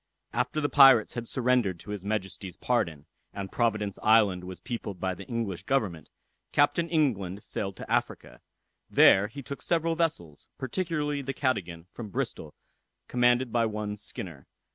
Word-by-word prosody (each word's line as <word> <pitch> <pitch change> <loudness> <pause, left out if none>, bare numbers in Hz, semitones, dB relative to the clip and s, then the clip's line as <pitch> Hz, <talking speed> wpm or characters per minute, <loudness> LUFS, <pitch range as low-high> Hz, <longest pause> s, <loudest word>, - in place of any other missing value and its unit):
After 155 - 0
the 145 - +1
pirates 135 -6 +7
had 120 -1 -5
surrendered 120 -9 +1
to 105 - -9
his 105 -3 -5
Majesty's 95 -3 -4
pardon, 85 - -1 0.3
and 100 -1 -5
Providence 110 -4 0
island 105 -5 +4
was 90 -1 -8
peopled 105 -4 -5
by 95 +1 -1
the - - -10
English 115 -8 -3
government, 95 - -1 0.4
Captain 145 +4 +2
England 105 - 0
sailed 100 -2 -4
to - - -9
Africa. - - -2 0.5
There 95 +2 +6
he 135 +6 -9
took 140 +1 -7
several 165 -1 +1
vessels, 85 - -2
particularly 150 0 -2
the 135 0 -4
Cadogan, 90 - -2
from 115 -3 -7
Bristol, - - -4 0.5
commanded 120 0 +2
by 115 -1 +3
one 105 -1 -4
Skinner. 105 - -8
110 Hz, 150 wpm, -28 LUFS, 95-135 Hz, 0.5 s, pirates